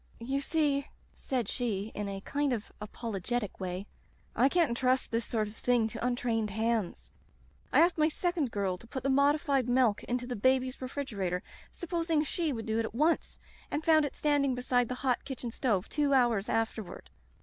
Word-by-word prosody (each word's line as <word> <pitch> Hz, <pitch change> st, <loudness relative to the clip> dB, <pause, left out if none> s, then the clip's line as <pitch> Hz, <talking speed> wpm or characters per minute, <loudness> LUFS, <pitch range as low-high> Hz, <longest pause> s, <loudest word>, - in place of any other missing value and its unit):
"*You 265 Hz, +4 st, -1 dB
see,' 285 Hz, -2 st, +1 dB, 0.3 s
said 250 Hz, -5 st, -2 dB
she 220 Hz, -4 st, -2 dB
in 205 Hz, -1 st, -3 dB
a 195 Hz, 0 st, -5 dB
kind 285 Hz, +4 st, 0 dB
of 220 Hz, -3 st, -4 dB
apolo 210 Hz, -1 st, -5 dB
getic 240 Hz, 0 st, -2 dB
way, 185 Hz, +1 st, -4 dB, 0.5 s
*I 255 Hz, +5 st, +4 dB
can't 340 Hz, 0 st, +3 dB
intrust 255 Hz, +2 st, +1 dB
this 230 Hz, -1 st, 0 dB
sort 215 Hz, -2 st, -1 dB
of 210 Hz, -, -10 dB
thing 240 Hz, -1 st, +2 dB
to 230 Hz, 0 st, -6 dB
untrained 240 Hz, -3 st, 0 dB
hands. 210 Hz, -, -1 dB, 0.6 s
I 285 Hz, -, +6 dB
asked 340 Hz, -1 st, +3 dB
my 310 Hz, +1 st, +4 dB
second 335 Hz, -4 st, -1 dB
girl 195 Hz, -4 st, -1 dB
to 230 Hz, -, -13 dB
put 260 Hz, +1 st, -5 dB
the 275 Hz, -, +2 dB
modified 280 Hz, -2 st, +3 dB
milk 245 Hz, -4 st, +3 dB
into 245 Hz, 0 st, -2 dB
the 245 Hz, 0 st, -4 dB
baby's 260 Hz, +4 st, +1 dB
refrigerator, 205 Hz, -9 st, -3 dB, 0.3 s
supposing 335 Hz, -3 st, 0 dB
she 320 Hz, +1 st, -1 dB
would 225 Hz, -4 st, -4 dB
do 220 Hz, 0 st, 0 dB
it 225 Hz, -, +1 dB
at 220 Hz, -, -7 dB
once 310 Hz, +6 st, +1 dB, 0.2 s
— -, -, -25 dB
and 305 Hz, -, -3 dB
found 315 Hz, -1 st, +6 dB
it 285 Hz, -, -5 dB
standing 285 Hz, -3 st, +2 dB
beside 245 Hz, -1 st, +1 dB
the 255 Hz, -, -2 dB
hot 250 Hz, -2 st, +2 dB
kitchen 250 Hz, -3 st, -5 dB
stove 215 Hz, -7 st, 0 dB
two 285 Hz, -2 st, +1 dB
hours 235 Hz, -5 st, +2 dB
afterward. 225 Hz, -3 st, -2 dB
245 Hz, 190 wpm, -30 LUFS, 220-280 Hz, 0.6 s, I